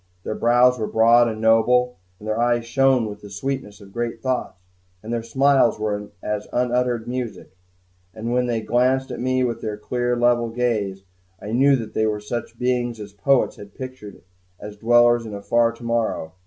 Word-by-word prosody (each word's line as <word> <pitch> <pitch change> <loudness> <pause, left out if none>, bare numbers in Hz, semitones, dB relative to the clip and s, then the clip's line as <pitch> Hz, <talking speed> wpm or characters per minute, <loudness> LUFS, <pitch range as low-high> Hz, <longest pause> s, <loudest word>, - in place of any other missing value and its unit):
Their - - -3
brows 120 +2 +3
were 110 - -1
broad 115 +2 +5
and 110 -1 -4
noble, 120 +2 +3 0.2
and 105 - -11
their 110 +1 -1
eyes 120 -1 +1
shone 130 0 +2
with 105 -1 -7
the 105 - -11
sweetness 105 0 -5
of 100 -1 -14
great 120 -1 -3
thoughts, 125 -6 -3 0.4
and 115 +2 -5
their 120 - -1
smiles 135 +1 +3
were 105 -1 -3
as 105 0 -3
unuttered 125 -1 0
music; 120 -6 -5 0.6
and 115 +4 -4
when 125 0 +1
they 115 -2 -1
glanced 130 +3 +1
at 125 - -5
me 130 +1 +1
with 120 -2 -2
their 105 -2 -4
clear, 120 +3 -1
level 120 -1 +2
gaze, 110 -5 -2 0.4
I 105 - -7
knew 135 +4 +4
that 115 -4 -5
they 110 - +1
were 105 -1 -1
such 115 +3 -6
beings 120 -2 -1
as 105 -1 -9
poets 125 +7 +1
had 100 0 -12
pictured 130 -9 -9 0.4
as 105 0 -9
dwellers 120 +2 +4
in 110 -2 -7
a 100 - -7
far 115 +1 +2
tomorrow. 115 -8 -2
120 Hz, 185 wpm, -22 LUFS, 110-125 Hz, 0.6 s, broad